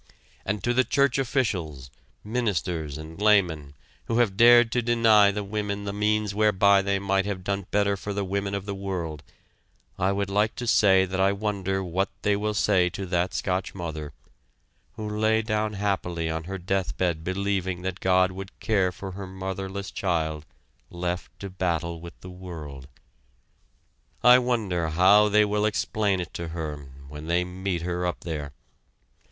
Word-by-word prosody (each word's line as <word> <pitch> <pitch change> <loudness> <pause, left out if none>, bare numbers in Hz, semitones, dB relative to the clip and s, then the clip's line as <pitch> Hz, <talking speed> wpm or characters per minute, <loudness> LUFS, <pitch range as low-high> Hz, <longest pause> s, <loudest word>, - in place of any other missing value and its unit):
And 100 -1 -2
to 120 - +1
the 130 +1 +4
church 140 0 +2
officials, 90 - -2 0.3
ministers 90 - -2
and 80 +4 -9
laymen 85 -9 +2 0.3
who 115 - -1
have 115 -5 +2
dared 120 +1 +7
to 125 - +1
deny 115 -3 +5
to 105 +1 -3
women 100 0 -3
the 100 -1 -4
means 105 0 0
whereby 100 -1 +4
they 100 0 0
might 95 0 0
have 95 -3 -4
done 100 0 -2
better 100 -1 +2
for 100 +1 -6
the 100 0 -2
women 100 +1 -2
of 100 -1 -4
the 100 - -3
world, 90 -6 -4 0.8
I 95 +2 +2
would 100 0 -2
like 105 +2 +1
to 125 - -5
say 95 -4 +5
that 95 +1 -4
I 95 +1 +3
wonder 100 -2 -2
what 95 +2 -1
they 105 0 +3
will 105 +1 -2
say 95 -3 +3
to 95 +2 -6
that 90 0 -1
Scotch 95 0 -2
mother, 80 -4 -5 0.8
who 110 - -6
lay 110 +1 +1
down 110 -1 -1
happily 90 -5 -2
on 80 0 -4
her 95 +2 -5
death 95 +1 -2
bed 85 -4 0
believing 95 -1 -2
that 95 0 -4
God 95 0 +3
would 95 +1 -9
care 95 -4 +1
for 95 +1 -8
her 95 +1 -7
motherless 95 +1 -5
child 80 -4 -2 0.4
left 90 +1 -4
to 100 - -4
battle 85 -2 -2
with 85 0 -11
the 90 - -9
world. 80 -8 -9 1.4
I 125 +1 +8
wonder 105 -10 -1
how 100 +6 +5
they 105 +1 +4
will 105 0 0
explain 105 -2 0
it 85 -3 -6
to 85 - -5
her 75 -4 -5 0.2
when 75 +2 -9
they 85 +1 +2
meet 90 -1 -3
her 90 0 -2
up 90 - -4
there! 75 -4 -5
95 Hz, 170 wpm, -26 LUFS, 90-105 Hz, 1.4 s, I